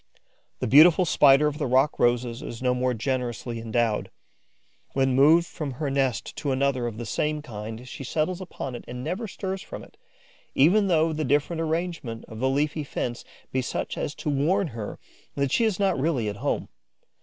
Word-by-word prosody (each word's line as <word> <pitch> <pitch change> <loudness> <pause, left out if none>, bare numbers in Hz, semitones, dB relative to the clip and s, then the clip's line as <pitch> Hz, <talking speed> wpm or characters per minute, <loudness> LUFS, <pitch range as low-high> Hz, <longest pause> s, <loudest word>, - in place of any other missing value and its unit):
The - - 0
beautiful 160 - +7
Spider 145 -2 +5
of 150 +1 -1
the 145 - 0
rock 130 +4 +2
roses 120 -1 +1
is 115 - -7
no 125 -1 +1
more 125 0 0
generously 120 -1 -3
endowed. 115 -1 0 0.8
When 135 -1 +2
moved 155 +6 +6
from 150 -5 -5
her 140 +2 -3
nest 135 -3 -1
to 145 - -2
another 130 -2 +1
of 115 -2 -6
the 120 - -5
same 150 +6 -1
kind, 110 0 -7
she 135 - -7
settles 160 +7 -1
upon 140 -7 -6
it 120 - -7
and 125 +1 -6
never 185 - -3
stirs 190 0 -4
from - - -8
it, - - -17 0.6
even 195 +9 +5
though 160 -2 +3
the 155 0 -2
different 150 +5 +1
arrangement 160 -8 -3
of 110 - -10
the 130 +2 +1
leafy 150 +3 0
fence 120 -3 -4 0.3
be 130 - 0
such 125 - -3
as 145 - -3
to - - -4
warn 165 +7 +1
her 110 -4 -6 0.4
that 140 -2 0
she 230 - +3
is 215 -5 +1
not 195 -6 +2
really 135 -6 0
at 100 - -6
home. 140 +6 -2
140 Hz, 190 wpm, -26 LUFS, 125-160 Hz, 0.8 s, beautiful